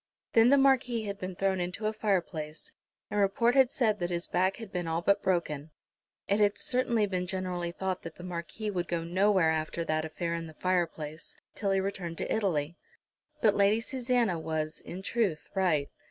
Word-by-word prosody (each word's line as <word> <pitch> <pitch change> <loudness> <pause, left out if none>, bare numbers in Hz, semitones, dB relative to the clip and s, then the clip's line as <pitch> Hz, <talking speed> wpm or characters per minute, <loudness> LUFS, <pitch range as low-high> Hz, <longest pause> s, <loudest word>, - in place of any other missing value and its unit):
Then 230 +1 +6
the 280 - +6
Marquis 255 -4 +3
had 200 -1 -5
been 185 0 -5
thrown 190 0 +1
into 180 +4 -3
a 215 - +1
fireplace, 170 -7 -2 0.4
and 210 - 0
report 220 +4 +3
had 265 -2 +5
said 220 -6 +1
that 175 -1 -1
his 175 0 0
back 190 +1 +1
had 225 -4 -9
been 175 -3 -3
all 165 +1 -1
but 200 +2 +3
broken. 160 -5 -1 0.6
It 200 +1 +2
had 205 -1 +3
certainly 240 -4 +2
been 185 -2 -2
generally 180 -2 -2
thought 185 +1 -3
that 165 -1 -8
the 175 - -11
Marquis 180 +4 -4
would 180 -3 -2
go 170 -1 -1
nowhere 185 -1 +3
after 160 +1 -2
that 155 0 0
affair 165 +2 -3
in 165 -1 -3
the 160 - -12
fireplace, 165 -4 -2 0.2
till 200 - -2
he 195 0 +3
returned 190 -4 -3
to - - -1
Italy. 170 -6 -1 0.7
But 215 -2 +6
Lady 200 +2 +4
Susanna 245 - 0
was, 160 0 -3
in 185 +2 -8
truth, 200 -8 0
right. 175 -7 +2
185 Hz, 190 wpm, -30 LUFS, 170-210 Hz, 0.7 s, Then